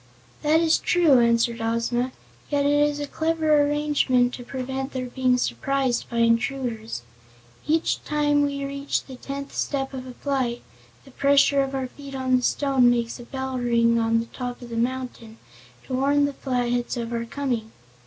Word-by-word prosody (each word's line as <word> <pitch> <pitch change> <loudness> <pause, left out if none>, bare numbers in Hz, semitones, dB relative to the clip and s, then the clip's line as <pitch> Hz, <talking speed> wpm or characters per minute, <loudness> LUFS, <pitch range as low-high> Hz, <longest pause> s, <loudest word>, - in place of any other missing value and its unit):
"That 310 +2 +3
is 325 -1 +3
true," 325 -8 +4
answered 235 0 +2
Ozma; 230 +2 0 0.4
"yet 285 -1 +1
it 290 +1 +4
is 290 0 -5
a 290 - -2
clever 315 0 +2
arrangement 290 -4 +2
to 245 - -7
prevent 265 +2 -4
their 255 -1 -3
being 250 0 +1
surprised 265 -1 -1
by 235 - -4
intruders. 230 - -1 0.6
Every 315 +1 +3 0.2
time 295 -1 +2
we 280 -1 -1
reach 280 0 -2
the 265 - -10
tenth 275 +2 -7
step 270 -1 -2
of 260 -1 -6
a 250 - -9
flight, 260 -4 -2 0.4
the 270 - -15
pressure 280 +1 +4
of 270 0 -2
our 265 -1 -1
feet 275 +2 -10
on 260 -1 +1
the 250 - +2
stone 265 -1 +3
makes 235 -1 0
a 240 - -9
bell 265 0 -4
ring 235 -1 +3
on 230 0 +1
top 245 0 -5
of 240 - -9
the - - -4
mountain, 240 -2 -3 0.5
to - - -6
warn 285 +2 +3
the 285 - -2
Flatheads 245 -2 -1
of 235 0 -4
our 235 0 -2
coming." 240 -4 -3
260 Hz, 175 wpm, -24 LUFS, 240-280 Hz, 0.6 s, true